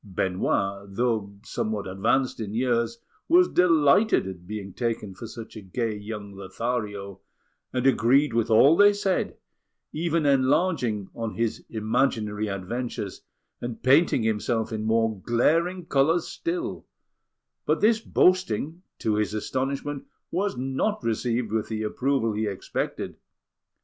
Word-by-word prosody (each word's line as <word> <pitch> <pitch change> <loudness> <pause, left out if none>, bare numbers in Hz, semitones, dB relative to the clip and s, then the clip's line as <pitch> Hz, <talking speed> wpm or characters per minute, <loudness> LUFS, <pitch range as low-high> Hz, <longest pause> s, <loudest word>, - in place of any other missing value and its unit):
Benoit, 100 +1 -1
though 110 -2 -1
somewhat 105 -2 -3
advanced 115 +9 0
in 105 -1 -4
years, 115 -1 +1 0.3
was 355 +2 +6
delighted 170 - +4
at 90 -2 -8
being 100 -3 -6
taken 115 -4 -2
for 105 +5 -8
such 115 0 -9
a 110 - -7
gay 110 +3 -2
young 105 -1 -7
Lothario, 100 0 -4 0.5
and 125 0 -1
agreed 135 +2 +4
with 115 0 +1
all 135 +8 +6
they 205 +3 +6
said, 200 -2 -1 0.6
even 165 0 0
enlarging 130 - +2
on 115 -2 -4
his 115 -1 -1
imaginary 110 -2 0
adventures 100 +1 -4 0.4
and 120 -1 -6
painting 135 -1 +4
himself 110 +1 0
in 110 0 -3
more 110 -2 +1
glaring 165 - +1
colours 160 +4 +2
still; 350 +1 -4 0.8
but - - +2
this 220 +1 +4
boasting, 180 - +1 0.2
to 110 -1 0
his 105 0 0
astonishment, 135 +5 -2 0.3
was 195 -4 -1
not 135 - -1
received 115 0 -1
with 110 -1 -1
the 110 -1 -3
approval 125 +1 0
he 110 +1 -1
expected. 100 -2 -4
115 Hz, 130 wpm, -26 LUFS, 105-140 Hz, 0.8 s, was